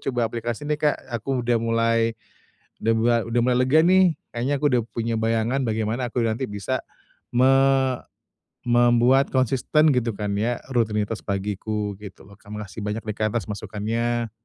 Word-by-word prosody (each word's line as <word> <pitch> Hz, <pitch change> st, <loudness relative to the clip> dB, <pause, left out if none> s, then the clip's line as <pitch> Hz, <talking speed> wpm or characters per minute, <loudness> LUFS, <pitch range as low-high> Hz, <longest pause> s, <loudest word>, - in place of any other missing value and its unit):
coba 120 Hz, -4 st, -1 dB
aplikasi 120 Hz, +4 st, -4 dB
nih, 150 Hz, -, +1 dB
Kak. 150 Hz, -1 st, +2 dB, 0.2 s
Aku 130 Hz, +3 st, -2 dB
udah 120 Hz, 0 st, +2 dB
mulai, 115 Hz, 0 st, +1 dB, 0.7 s
udah 115 Hz, -, +3 dB
mua 120 Hz, +1 st, +3 dB
udah 120 Hz, +1 st, +1 dB
mulai 125 Hz, 0 st, +2 dB
lega, 150 Hz, +5 st, +5 dB
nih. 185 Hz, -1 st, +5 dB, 0.2 s
Kayaknya 125 Hz, +5 st, 0 dB
aku 150 Hz, -, +2 dB
udah 120 Hz, -, +3 dB
punya 115 Hz, 0 st, -2 dB
bayangan 115 Hz, +4 st, 0 dB
bagaimana 110 Hz, +3 st, -1 dB
aku 120 Hz, -, -1 dB
nanti 115 Hz, +4 st, -1 dB
bisa 100 Hz, -2 st, -3 dB, 0.5 s
me 130 Hz, +2 st, +5 dB, 1.2 s
membuat 120 Hz, +3 st, +4 dB
konsisten, 135 Hz, +4 st, +2 dB
gitu 120 Hz, -2 st, 0 dB
kan, 105 Hz, -1 st, -3 dB
ya, 115 Hz, +3 st, 0 dB
rutinitas 110 Hz, -2 st, 0 dB
pagiku, 105 Hz, +1 st, -3 dB
gitu 100 Hz, -2 st, -11 dB
lo. 100 Hz, -, -15 dB
KaK, 100 Hz, -, -17 dB
makasih 105 Hz, 0 st, -7 dB
banyak 105 Hz, +2 st, -3 dB
nih 105 Hz, -1 st, -4 dB
Kak, 110 Hz, +1 st, -1 dB
atas 110 Hz, -, -1 dB
masukannya. 115 Hz, +3 st, -2 dB
115 Hz, 160 wpm, -23 LUFS, 110-125 Hz, 1.2 s, lega